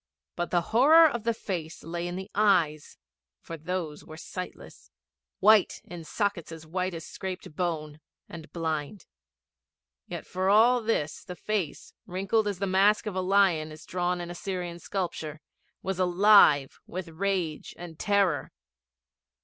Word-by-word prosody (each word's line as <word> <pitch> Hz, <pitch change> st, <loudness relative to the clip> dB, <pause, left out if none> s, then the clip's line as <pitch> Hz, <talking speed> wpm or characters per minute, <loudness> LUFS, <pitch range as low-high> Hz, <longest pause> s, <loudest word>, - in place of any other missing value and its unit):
But 175 Hz, -, -2 dB
the 175 Hz, -, +2 dB
horror 310 Hz, +8 st, +8 dB
of 235 Hz, -6 st, -4 dB
the 230 Hz, -, +2 dB
face 170 Hz, -7 st, -5 dB
lay 170 Hz, +2 st, -4 dB
in 175 Hz, -, -4 dB
the 190 Hz, +1 st, -7 dB
eyes, 175 Hz, -8 st, +2 dB, 0.4 s
for 165 Hz, -, -8 dB
those 160 Hz, -1 st, -4 dB
were 155 Hz, -, -11 dB
sightless 180 Hz, +3 st, -9 dB, 0.5 s
white, 210 Hz, 0 st, +5 dB
in 175 Hz, -2 st, -9 dB
sockets 200 Hz, -4 st, -2 dB
as 160 Hz, -1 st, -9 dB
white 180 Hz, +2 st, -2 dB
as 165 Hz, -, -7 dB
scraped 185 Hz, -5 st, -7 dB
bone, 155 Hz, -4 st, -3 dB, 0.3 s
and 165 Hz, -2 st, -10 dB
blind. 160 Hz, +2 st, -3 dB, 1.0 s
Yet -, -, -6 dB
for 185 Hz, +1 st, -1 dB
all 235 Hz, +4 st, +5 dB
this 185 Hz, -10 st, -1 dB
the 180 Hz, -, -8 dB
face, 200 Hz, -5 st, -3 dB
wrinkled 195 Hz, +4 st, 0 dB
as 200 Hz, -3 st, -2 dB
the 200 Hz, -, -1 dB
mask 195 Hz, +3 st, +3 dB
of 210 Hz, -3 st, -4 dB
a 185 Hz, -, 0 dB
lion 185 Hz, -5 st, +3 dB
is 155 Hz, +1 st, -12 dB
drawn 180 Hz, 0 st, -1 dB
in 175 Hz, 0 st, -6 dB
Assyrian 175 Hz, -1 st, -5 dB
sculpture, 160 Hz, -5 st, -4 dB, 0.4 s
was 190 Hz, -1 st, -3 dB
alive 180 Hz, -6 st, +5 dB
with 180 Hz, 0 st, -5 dB
rage 175 Hz, -2 st, -2 dB
and 170 Hz, -2 st, -10 dB
terror. 195 Hz, -9 st, +1 dB
180 Hz, 150 wpm, -28 LUFS, 160-200 Hz, 1.0 s, horror